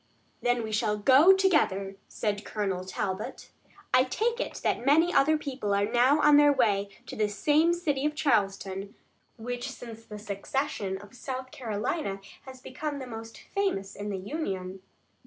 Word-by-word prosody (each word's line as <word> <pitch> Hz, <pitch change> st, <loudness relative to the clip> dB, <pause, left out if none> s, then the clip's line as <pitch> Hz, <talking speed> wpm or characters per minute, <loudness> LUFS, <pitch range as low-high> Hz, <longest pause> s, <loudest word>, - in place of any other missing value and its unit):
"Then 245 Hz, -1 st, +1 dB
we 220 Hz, -, -5 dB
shall 210 Hz, -1 st, +1 dB
go 265 Hz, -, +7 dB
together," 295 Hz, -, +2 dB
said 205 Hz, -1 st, -2 dB
Colonel 195 Hz, -4 st, -2 dB
Talbot. 190 Hz, +2 st, -4 dB, 0.4 s
"I 255 Hz, -, +6 dB
take 460 Hz, -, -1 dB
it -, -, -3 dB
that -, -, 0 dB
many 320 Hz, +6 st, +4 dB
other 310 Hz, +3 st, +4 dB
people 255 Hz, -9 st, -2 dB
are 200 Hz, 0 st, +2 dB
now 245 Hz, +6 st, +3 dB
on 295 Hz, -1 st, +7 dB
their 290 Hz, 0 st, +6 dB
way 205 Hz, -7 st, +2 dB, 0.2 s
to -, -, -8 dB
this 210 Hz, -1 st, -1 dB
same 310 Hz, +7 st, +3 dB
city 305 Hz, -6 st, -1 dB
of 300 Hz, -, -4 dB
Charleston, 195 Hz, -7 st, 0 dB, 0.4 s
which 245 Hz, +3 st, -4 dB
since 230 Hz, -4 st, -10 dB
the 210 Hz, -2 st, -9 dB
secession 205 Hz, 0 st, -3 dB
of 205 Hz, +1 st, -14 dB
South 260 Hz, 0 st, -6 dB
Carolina 215 Hz, -, -3 dB, 0.3 s
has 260 Hz, -1 st, -10 dB
become 290 Hz, +3 st, -5 dB
the 265 Hz, -, -6 dB
most 225 Hz, -1 st, -8 dB, 0.2 s
famous 290 Hz, -, -1 dB
in 205 Hz, +1 st, -5 dB
the 200 Hz, -, -2 dB
Union." 190 Hz, -, -4 dB
240 Hz, 160 wpm, -28 LUFS, 205-290 Hz, 0.4 s, go